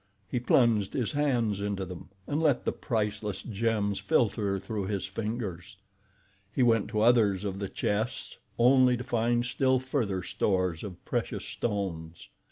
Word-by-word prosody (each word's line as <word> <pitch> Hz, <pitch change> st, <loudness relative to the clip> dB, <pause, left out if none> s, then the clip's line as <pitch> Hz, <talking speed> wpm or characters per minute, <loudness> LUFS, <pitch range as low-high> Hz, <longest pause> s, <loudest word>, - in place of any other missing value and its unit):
He 125 Hz, -, -1 dB
plunged 115 Hz, -4 st, +3 dB
his 125 Hz, -5 st, -1 dB
hands 120 Hz, -9 st, +1 dB
into 100 Hz, -2 st, -2 dB
them 90 Hz, -1 st, -9 dB, 0.2 s
and 145 Hz, +2 st, -1 dB
let 145 Hz, -6 st, +2 dB
the -, -, +2 dB
priceless 105 Hz, -3 st, -2 dB
gems 105 Hz, -2 st, 0 dB
filter 100 Hz, 0 st, +1 dB
through 100 Hz, 0 st, -4 dB
his 100 Hz, -2 st, -2 dB
fingers. 100 Hz, -3 st, -5 dB, 0.7 s
He 130 Hz, -, +1 dB
went 115 Hz, -4 st, +3 dB
to 105 Hz, 0 st, -1 dB
others 105 Hz, -4 st, +4 dB
of 95 Hz, -1 st, -3 dB
the 100 Hz, -2 st, -3 dB
chests, 110 Hz, +4 st, -2 dB, 0.2 s
only 125 Hz, +1 st, +5 dB
to 125 Hz, -, -5 dB
find 120 Hz, +1 st, +1 dB
still 130 Hz, +1 st, +2 dB
further 120 Hz, -8 st, -1 dB
stores 90 Hz, -4 st, 0 dB
of 95 Hz, -4 st, -8 dB
precious -, -, -2 dB
stones. 85 Hz, -7 st, -4 dB
105 Hz, 150 wpm, -29 LUFS, 100-120 Hz, 0.7 s, only